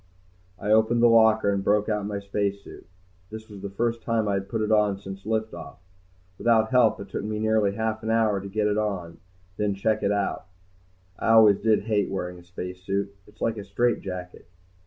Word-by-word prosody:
I 105 +3 -3
opened 110 +2 +3
the - - +8
locker 110 -2 +4
and 100 -1 -2
broke 105 +1 +2
out 105 -2 -1
my 105 -1 -3
spacesuit. 100 0 -4 0.4
This 110 0 -9
was 100 -3 -11
the 100 - -5
first 115 +3 -2
time 110 -1 0
I 100 - 0
had 100 0 -3
put 110 -2 -1
it 105 - -1
on 105 -2 +3
since 95 0 -9
lift 110 0 -1
off. - - -9 0.6
Without 110 -2 +3
help, 125 -3 +4
it 100 0 -8
took - - -4
me 105 0 -3
nearly 110 -2 +1
half 110 0 -2
an 110 - -4
hour 110 -3 +2
to 100 - -8
get 105 +1 -1
it 105 0 +1
on 100 -5 -2
and 85 - -14 0.4
then 105 -1 0
check 110 +2 0
it 100 - +1
out. 100 -2 -2 0.7
I - - -1
always 110 -3 +6
did 110 -2 +2
hate 105 -3 0
wearing 90 -2 -4
a - - -16
spacesuit, 90 +3 -5
it's 105 - -21
like 115 -1 0
a - - -6
straitjacket. 95 -4 -3
105 Hz, 205 wpm, -25 LUFS, 100-110 Hz, 0.7 s, the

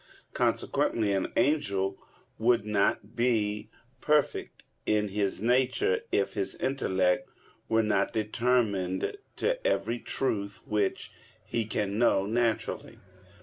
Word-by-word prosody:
Consequently 105 -3 +1
an 95 -1 -1
angel 100 -9 +1 0.4
would 115 -1 +3
not 105 0 0
be 110 -4 0 0.3
perfect 150 -2 +1 0.2
in 105 -1 +2
his 100 0 -1
nature, 130 - +2
if - - +1
his 385 - -2
intellect 95 -9 0 0.4
were 115 0 +3
not 100 -2 +1
determined 110 - 0 0.2
to - - -1
every 120 - 0
truth 100 -7 -2
which 105 -2 -1 0.3
he 115 -2 -1
can 105 -1 -2
know 100 -5 +3
naturally. 115 +1 -1
110 Hz, 105 wpm, -29 LUFS, 100-120 Hz, 0.4 s, would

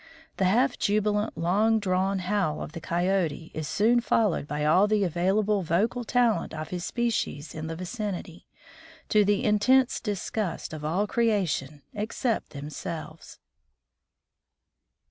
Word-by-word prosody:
The 190 - +2
half 245 +8 +2
jubilant 210 +1 0
long 210 +6 +2
drawn 190 -1 0
howl 185 -4 -1
of - - -8
the 165 - -8
Coyote 170 -2 -1
is 155 -1 -4
soon 230 +4 +3
followed 215 -10 +1
by 150 0 -2
all 185 +7 +5
the 210 -1 +2
available 195 +4 +1
vocal 205 +9 0
talent 235 -6 +1
of 155 0 -5
his 180 -1 -4
species 225 - -2
in 155 0 -5
the 165 - -4
vicinity, 185 -2 -5 0.6
to 210 -1 +5
the 205 +3 +1
intense 255 +4 +3
disgust 205 -4 -3
of 155 -1 -7
all 175 +7 0
creation 180 - 0
except 220 +3 -2
themselves. 155 +2 -7
195 Hz, 130 wpm, -27 LUFS, 165-215 Hz, 0.6 s, all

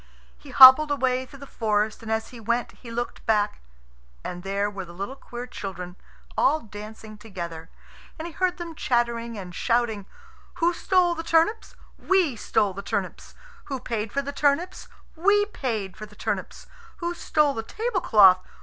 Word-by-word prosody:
He - - -15
hobbled 265 +4 +9
away 260 -2 0
through 275 - -13
the - - -7
forest, 215 -4 -1
and 220 -1 -6
as 220 0 -1
he 245 - -11
went 235 +2 -1
he 240 - -13
looked 240 +1 -4
back, 210 -2 +1 0.6
and 180 - -6
there 200 +2 -1
were 200 -2 -6
the 175 -1 -12
little 200 +8 -5
queer 245 -2 -8
children 180 -6 -7 0.4
all 305 +3 +3
dancing 215 0 -10
together, 170 -6 -7 0.5
and 320 - -6
he 340 - -6
heard 360 +1 0
them 340 -2 -6
chattering 235 -4 -1
and 180 -3 -8
shouting: 225 -2 0 0.5
"Who 340 +1 +2
stole 360 0 +2
the 330 - -5
turnips? 330 +7 +1 0.2
We 365 -9 +2
stole 210 -2 0
the 195 - -6
turnips. - - -4 0.3
Who 270 -2 -4
paid 225 -4 -3
for 280 - -1
the 285 +1 -5
turnips? 295 +6 0 0.3
We 410 +5 +3
paid 225 - -4
for 215 - -9
the 210 - -18
turnips. 205 -3 -4 0.3
Who 345 0 -3
stole 300 -4 +1
the 225 - -3
tablecloth? 235 - +4
235 Hz, 170 wpm, -25 LUFS, 205-300 Hz, 0.6 s, hobbled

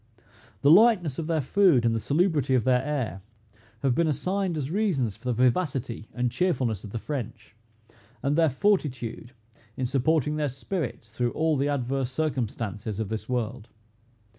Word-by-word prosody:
The 140 - +6
lightness 180 - +5
of 160 - -3
their 160 -2 +1
food, 165 -5 +4
and 115 - +3
the 115 - 0
salubrity 145 - +1
of 125 - +2
their 125 -1 +3
air, 135 -9 -3 0.6
have 135 -2 +3
been 170 +5 +2
assigned 185 +3 -1
as 145 0 -3
reasons 165 - 0
for 110 - -22
the 125 - +1
vivacity 125 -2 0
and 125 -1 -1
cheerfulness 130 - 0
of 105 - -8
the 115 - -4
French, 120 -3 -6 0.7
and 140 +2 +1
their 165 -1 +4
fortitude, 130 - -1 0.4
in 130 - -1
supporting 150 +3 +1
their 150 -2 0
spirits 135 - -5
through 120 +1 -1
all 160 0 +1
the 140 +1 0
adverse 135 -2 -1
circumstances 115 -7 -3
of 110 -3 -2
this 110 +2 -5
world. 120 -2 -2
135 Hz, 165 wpm, -26 LUFS, 120-160 Hz, 0.7 s, The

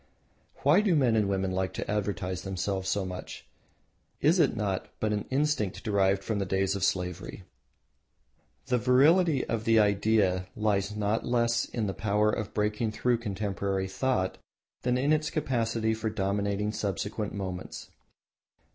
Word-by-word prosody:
Why - - +5
do 200 -5 +2
men 125 -6 +3
and 105 -3 +2
women 95 -1 0
like 95 0 -1
to - - -4
advertise 100 -3 -2
themselves 95 0 -2
so 95 0 0
much? 90 -1 -7 0.7
Is - - +3
it - - +3
not - - -2
but 110 -1 0
an 105 - -2
instinct 135 -8 0
derived 100 -2 +2
from 110 -2 -2
the - - 0
days 95 +1 +1
of 100 - -3
slavery? 90 0 -2 1.2
The 125 -1 +1
virility 140 - +4
of 115 -1 -2
the 115 0 +3
idea 100 -3 +2
lies 105 -1 0
not 105 +2 0
less 115 -1 +2
in 115 -3 -3
its 95 - -5
power 105 0 +2
of 110 -1 -3
breaking 105 +1 0
through 120 +2 +1
contemporary 100 -3 -2
thought 95 -2 -1 0.4
than 125 0 +1
in 140 +4 +2
its 155 0 +1
capacity 115 -7 0
for 110 0 -2
dominating 100 0 -1
subsequent 105 0 -3
movements. 95 -2 -6
105 Hz, 150 wpm, -28 LUFS, 95-115 Hz, 1.2 s, Why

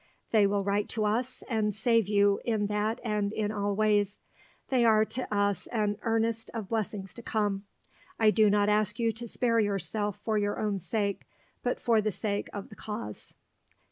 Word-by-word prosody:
They 210 -3 +5
will 200 0 0
write 200 +1 0
to 215 - +2
us, 240 +5 -1
and 215 -3 0
save 230 -2 +2
you 200 -1 +3
in 220 -3 0
that 210 +3 -1
and 210 -3 0
in 215 -1 -1
all 205 -1 -1
ways. 205 -1 +2 0.5
They 255 -3 +3
are 220 -2 +5
to 255 +2 -4
us 205 -2 +1
an 210 -3 0
earnest 225 0 0
of 220 -4 -4
blessings 210 -4 -2
to 235 - -10
come. 205 -3 -1 0.5
I 220 -1 +6
do 215 -1 +4
not 205 0 +3
ask 210 0 +2
you 230 -1 +2
to 235 +2 -8
spare 230 0 +1
yourself 205 0 -1
for 215 -2 0
your 205 0 -1
own 205 -2 0
sake, 200 +2 -2 0.3
but 245 - -1
for 230 -3 +3
the 215 0 0
sake 205 +1 -2
of 200 -1 -7
the 210 - -12
cause. 160 - -7
210 Hz, 185 wpm, -29 LUFS, 205-225 Hz, 0.5 s, I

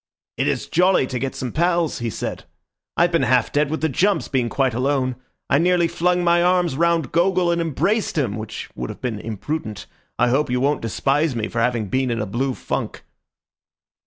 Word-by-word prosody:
"It - - 0
is - - -1
jolly 180 -3 +3
to 125 -1 -4
get 135 +2 -3
some 125 -2 -4
pals," 170 0 +1
he 120 -1 -2
said. - - -5 0.5
"I've 175 +1 +4
been 165 - +2
half 125 -2 +2
dead 145 0 +1
with 160 - -3
the 160 - +2
jumps, 180 +5 +1
being 125 -4 0
quite 130 -2 +1
alone. 130 +1 0 0.3
I 140 - +3
nearly 175 0 +3
flung 175 +1 +1
my 170 0 +4
arms 180 -4 +2
round 165 -3 +1
Gogol 175 +1 +2
and 170 0 0
embraced 180 - 0
him, 120 -9 0
which 110 -1 -7
would - - -5
have - - -8
been 115 -5 -3
imprudent. 110 +1 -5 0.3
I 125 - +3
hope 135 +3 +1
you 125 0 0
won't 140 +2 +1
despise 140 +5 0
me 110 -2 -2
for 115 - -1
having 120 -2 +1
been 130 +5 0
in 115 -1 -1
a 105 - -1
blue 125 +6 -2
funk." - - -4
140 Hz, 200 wpm, -21 LUFS, 120-170 Hz, 0.5 s, I've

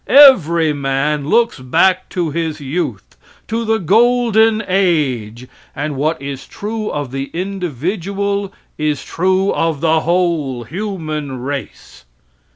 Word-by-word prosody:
Every 170 - +6
man 140 +1 -1
looks 235 - +2
back 185 +9 +2
to 170 -4 -2
his 160 0 -2
youth, 145 +5 -4 0.3
to 230 +1 -2
the 225 0 +1
golden 225 +2 +3
age, 135 - 0 0.3
and 150 +1 -3
what 150 +2 0
is 135 -1 -7
true 215 +1 -4
of 145 -4 -4
the 135 0 -3
individual 195 - -2 0.3
is 150 -2 -1
true 190 +2 +1
of 165 -3 0
the 160 +1 +3
whole 165 -7 0
human 155 - -4
race. 140 - -7
165 Hz, 120 wpm, -17 LUFS, 145-200 Hz, 0.3 s, Every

